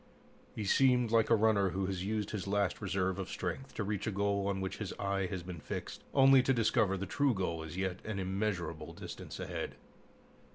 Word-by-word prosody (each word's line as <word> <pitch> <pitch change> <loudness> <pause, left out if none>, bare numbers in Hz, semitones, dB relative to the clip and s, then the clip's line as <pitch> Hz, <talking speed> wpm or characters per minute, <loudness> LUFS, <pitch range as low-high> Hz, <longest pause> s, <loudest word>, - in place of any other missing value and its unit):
He 105 - -3
seemed 125 +1 +4
like 115 -1 +4
a 115 - +7
runner 105 -3 +3
who 95 +1 -1
has 95 -1 -2
used 105 0 -2
his 100 -3 -4
last 100 0 0
reserve 95 -1 0
of 95 - -4
strength 130 +10 -4
to 110 - -1
reach 105 0 -2
a - - +1
goal 100 0 0
on 100 -1 0
which 95 0 -3
his 105 -3 -4
eye 100 -1 -1
has 90 -1 -4
been 90 -2 -7
fixed, - - -6
only 135 -1 +7
to 135 +1 +2
discover 110 -4 +2
the 95 - -3
true 135 +5 +2
goal 85 -4 -1
is 80 +2 -7
yet 95 -1 -2
an 105 -2 -4
immeasurable 95 -5 -2
distance - - -8
ahead. - - -4
100 Hz, 205 wpm, -33 LUFS, 95-110 Hz, -, a